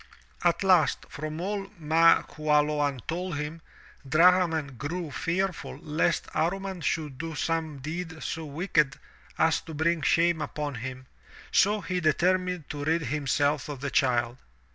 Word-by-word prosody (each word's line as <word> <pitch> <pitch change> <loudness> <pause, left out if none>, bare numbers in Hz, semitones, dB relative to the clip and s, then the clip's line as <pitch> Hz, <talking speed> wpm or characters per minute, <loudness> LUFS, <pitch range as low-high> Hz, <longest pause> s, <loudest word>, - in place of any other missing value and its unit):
At 175 +2 +2
last, 180 -6 +3
from 155 +1 -5
all 195 +2 -3
Ma 165 +1 +5
Qualoan 150 -3 +1
told 175 -1 -3
him, 150 +2 -5 0.5
Drahman 165 -3 +4
grew 155 +5 -4
fear 185 +7 0
ful 165 - -8
lest 160 +2 0
Amman 190 +1 -1
should 150 -5 -2
do 165 -1 -4
some 160 -2 -1
deed 160 +3 -6
so 160 - -3
wicked 150 -2 0 0.4
as 160 - +3
to 160 - -9
bring 165 +2 +1
shame 170 +1 +3
upon 150 -1 -3
him, 130 +1 -6 0.5
so 205 +2 +3
he 185 -2 -2
determined 180 +1 +1
to 145 -1 -5
rid 160 +2 +1
himself 145 0 0
of 145 -3 -5
the 140 -1 -3
child. 120 -2 +1
160 Hz, 140 wpm, -27 LUFS, 145-175 Hz, 0.5 s, Ma